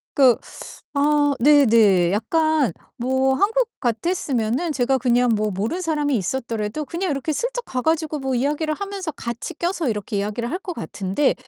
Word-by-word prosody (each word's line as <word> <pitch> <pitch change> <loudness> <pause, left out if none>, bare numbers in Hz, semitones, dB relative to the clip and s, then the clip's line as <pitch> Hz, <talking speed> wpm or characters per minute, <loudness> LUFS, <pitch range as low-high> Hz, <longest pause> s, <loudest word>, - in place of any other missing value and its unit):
그 260 -5 +6 0.6
아 290 0 +3
네네. 225 -10 +5
약간 300 - +1 0.2
뭐 260 +2 +1
한국 450 - +1
같았으면은 260 +1 -1
제가 265 -1 +1
그냥 245 0 +2
뭐 215 0 0
모르는 215 - -2
사람이 300 -5 0
있었더래도 225 - -3
그냥 345 +3 -3
이렇게 275 +3 -2
슬쩍 - - -2
가 255 - -3
가지고 315 0 0
뭐 265 -1 -2
이야기를 300 +5 0
하면서 395 -3 -5
같이 235 -4 -6
껴서 345 -3 -1
이렇게 210 -1 -3
이야기를 215 +4 -3
할 355 - -2
것 365 - -5
같은데 195 +7 -1
270 Hz, 340 characters per minute, -22 LUFS, 230-315 Hz, 0.6 s, 그